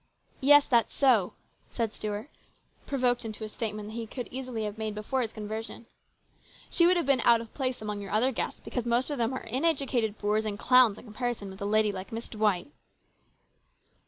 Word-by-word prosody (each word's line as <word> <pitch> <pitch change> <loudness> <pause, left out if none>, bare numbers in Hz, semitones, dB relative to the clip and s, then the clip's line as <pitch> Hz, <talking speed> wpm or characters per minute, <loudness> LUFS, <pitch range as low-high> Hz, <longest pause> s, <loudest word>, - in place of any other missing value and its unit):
" - - -34
Yes, 290 -1 +8
that's 235 -3 +2
so," 245 -9 +3 0.4
said 225 -3 -2
Stuart, 210 +3 -4 0.6
provoked 250 -3 +1
into 220 -1 -6
a 215 - -5
statement 215 -1 -4
he 225 0 -5
could 245 +2 -6
easily 255 -3 -4
have 210 +1 -5
made 215 -1 -3
before 235 +5 -1
his 225 -3 -2
conversion. 220 +2 -6 0.4
" - - -25
She 340 - +5
would 360 0 +4
have 340 - 0
been 275 -1 +3
out 235 -1 +5
of 230 -1 -10
place 255 -4 -2
among 210 -1 -4
your 200 - -7
other 225 +6 +2
guests, 235 - -3
because 245 -2 -3
most 240 +5 +1
of 285 - -3
them 230 +1 +1
are 260 - -5
uneducated 255 -5 0
boors 210 +1 0
and 210 -2 -3
clowns 250 -3 +5
in - - -12
comparison 220 -2 -4
with 190 - -12
a - - -2
lady 215 0 +3
like 190 -1 -7
Miss 230 +1 -5
D 215 - -9
wight! 210 +2 +1
225 Hz, 205 wpm, -28 LUFS, 210-255 Hz, 0.6 s, Yes